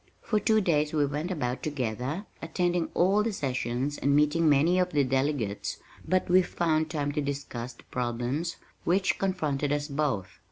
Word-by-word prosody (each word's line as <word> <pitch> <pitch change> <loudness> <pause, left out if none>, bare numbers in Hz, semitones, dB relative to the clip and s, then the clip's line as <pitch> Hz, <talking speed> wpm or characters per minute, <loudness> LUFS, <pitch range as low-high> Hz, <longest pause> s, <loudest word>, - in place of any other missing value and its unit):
For 215 - +1
two 220 +1 +3
days 155 -5 +1
we 150 -2 +3
went 150 +5 -3
about 130 -8 -2
together, 135 - -3 0.2
attending 175 +1 0
all 195 +4 +4
the 225 +1 0
sessions 130 - -2
and 140 0 +2
meeting 150 +2 +4
many 155 +6 +4
of 180 -2 0
the 145 -1 +4
delegates, 130 -5 -1 0.3
but 185 0 +2
we 185 +1 +6
found 160 -3 0
time 145 -3 -1
to 150 +1 -1
discuss 140 -4 -4
the - - -18
problems 125 +7 -2 0.3
which 190 +3 +1
confronted 150 -7 0
us 145 0 0
both. 135 -11 -2
150 Hz, 165 wpm, -28 LUFS, 135-175 Hz, 0.3 s, we